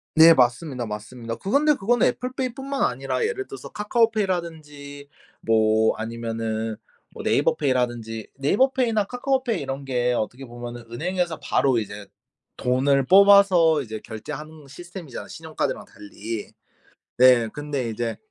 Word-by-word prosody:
네. 165 Hz, +1 st, +9 dB
맞습니다, 125 Hz, 0 st, +1 dB
맞습니다. 115 Hz, +2 st, -6 dB
그건데 285 Hz, -, +2 dB
그거는 240 Hz, +4 st, +2 dB
애플 250 Hz, 0 st, -2 dB
페이뿐만 270 Hz, +2 st, -3 dB
아니라 130 Hz, 0 st, -1 dB
예를 395 Hz, 0 st, -3 dB
들어서 405 Hz, -, -9 dB
카카오 225 Hz, +2 st, +1 dB
페이라든지 155 Hz, -8 st, -4 dB, 0.3 s
뭐 110 Hz, 0 st, +3 dB
아니면은 115 Hz, -1 st, -3 dB, 0.3 s
뭐 -, -, -10 dB
네이버 -, -, +2 dB
페이라든지 120 Hz, -5 st, -2 dB
네이버 200 Hz, -, +2 dB
페이나 230 Hz, -6 st, +1 dB
카카오 260 Hz, +4 st, -1 dB
페이 230 Hz, -, -1 dB
이런 135 Hz, 0 st, -5 dB
게 125 Hz, -2 st, 0 dB
어떻게 125 Hz, +4 st, -3 dB
보면은 120 Hz, 0 st, -8 dB
은행에서 175 Hz, +5 st, -2 dB
바로 130 Hz, -3 st, +1 dB
이제 105 Hz, -2 st, -5 dB, 0.5 s
돈을 135 Hz, +2 st, +2 dB
뽑아서 190 Hz, -5 st, +6 dB
이제 110 Hz, -2 st, -7 dB
결제하는 150 Hz, +7 st, -8 dB
시스템이잖아 175 Hz, -1 st, -9 dB
신용카드랑 160 Hz, -1 st, -4 dB
달리. 105 Hz, +1 st, -8 dB, 0.7 s
네. 125 Hz, -2 st, +6 dB
근데 145 Hz, -5 st, -3 dB
이제 115 Hz, 0 st, -3 dB
140 Hz, 355 characters per minute, -24 LUFS, 115-190 Hz, 0.7 s, 네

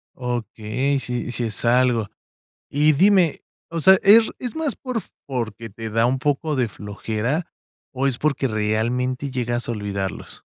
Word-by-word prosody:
Okey, 125 Hz, +2 st, -2 dB
sí, 125 Hz, -1 st, -3 dB
sí 120 Hz, -, -1 dB
es 110 Hz, -1 st, -1 dB
algo. 120 Hz, -3 st, +3 dB, 0.6 s
Y 150 Hz, +2 st, +3 dB
dime, 185 Hz, 0 st, +4 dB, 0.3 s
o 165 Hz, -1 st, -3 dB
sea, 190 Hz, +2 st, +7 dB
¿es 220 Hz, +3 st, +7 dB
es 245 Hz, +2 st, -5 dB
más 320 Hz, -3 st, -1 dB
por 255 Hz, -5 st, -4 dB, 0.2 s
porque 115 Hz, -4 st, -4 dB
te 110 Hz, +2 st, -7 dB
da 115 Hz, +2 st, +2 dB
un 130 Hz, +2 st, +1 dB
poco 150 Hz, +2 st, 0 dB
de 125 Hz, -3 st, +1 dB
flojera, 110 Hz, -, -3 dB, 0.4 s
o 135 Hz, 0 st, 0 dB
es 125 Hz, -3 st, -1 dB
porque 140 Hz, -3 st, 0 dB
realmente 120 Hz, +5 st, -1 dB
llegas 120 Hz, -2 st, -2 dB
a -, -, -1 dB
olvidarlos? 100 Hz, -3 st, -5 dB
125 Hz, 155 wpm, -22 LUFS, 115-145 Hz, 0.6 s, sea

